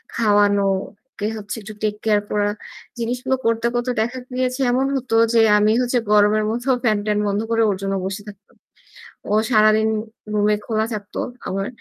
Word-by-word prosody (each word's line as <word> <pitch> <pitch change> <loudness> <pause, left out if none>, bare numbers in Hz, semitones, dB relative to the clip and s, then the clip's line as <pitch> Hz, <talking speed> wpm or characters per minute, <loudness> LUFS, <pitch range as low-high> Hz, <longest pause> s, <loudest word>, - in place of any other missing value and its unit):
খাওয়ানো, 205 -2 +3 0.5
ওকে 205 - -4
হচ্ছে 210 +2 -6
একটু 215 +1 -9
take 210 -1 0
care 210 -1 +2
করা। 205 -1 +1 0.5
জিনিসগুলো 250 +3 -1
করতে, 230 0 +1
করতে 240 +1 0
দেখা 245 +3 -2
গিয়েছে। 255 +1 -1
এমন 260 +2 +1
হতো 255 -3 -2 0.2
যে 230 - +5 0.2
আমি 210 +1 +3
হচ্ছে 245 0 +1
গরমের 210 +1 +4
মধ্যেও 245 +4 0
ফ্যান-ট্যান 210 -2 +1
বন্ধ 200 0 0
করে 230 - +2
ওর 200 - 0
জন্য 195 0 -2
বসে 195 +2 -4
থাকতাম। 200 0 -16 0.8
ও - - +2 0.2
সারাদিন 215 0 +4 0.5
রুমে 210 0 +2
খোলা 220 -1 0
থাকত 205 -1 -7 0.3
আমার। 195 +1 -2
215 Hz, 165 wpm, -21 LUFS, 205-240 Hz, 0.8 s, যে